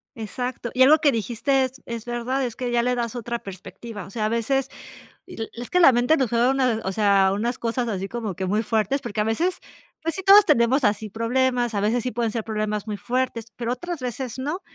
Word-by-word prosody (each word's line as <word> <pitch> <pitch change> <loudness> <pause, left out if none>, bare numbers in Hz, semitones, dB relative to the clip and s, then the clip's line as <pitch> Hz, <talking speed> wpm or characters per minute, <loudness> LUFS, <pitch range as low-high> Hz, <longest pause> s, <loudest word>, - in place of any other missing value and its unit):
Exacto. 245 +2 -4
Y 260 - +6
algo 300 +4 +6
que 295 -3 +4
dijiste 245 +4 0
es 260 +1 -9
es 235 -1 -5
verdad, 245 +3 -2
es 235 -3 -5
que 250 -1 -3
ya 240 0 +2
le 250 +1 +1
das 235 -1 -2
otra 235 0 -4
perspectiva. 200 +1 -9
O 195 - -13
sea, 215 0 -2
a 215 - +1
veces 250 +4 0 0.6
es 240 -7 -7
que 360 - +3
la 270 -6 +8
mente 245 +7 +3
nos 260 -4 +1
juega 240 +2 +2
una 255 -4 +1
o 190 - -1
sea, 200 -2 +3
unas 235 +4 -2
cosas 235 +1 -2
así 195 -3 -3
como 220 -5 -4
que 190 - -4
muy 210 +4 +1
fuertes, 220 +5 0
porque, 210 -3 -4
a - - -1
veces, 335 +12 0 0.4
pues, 330 0 -1
sí 380 - -5
todos 400 +2 +8
tenemos 250 - +3
así 210 +1 +1
problemas. 240 +2 0
A 200 - 0
veces 225 +4 +1
sí 250 - -2
pueden 230 -1 -1
ser 225 0 -3
problemas 215 -1 -2
muy 210 -2 -4
fuertes, 250 -2 -2
pero, 240 0 -2
otras 340 +5 -5
veces 250 0 -5
no. 295 +8 -3
235 Hz, 230 wpm, -23 LUFS, 220-260 Hz, 0.6 s, la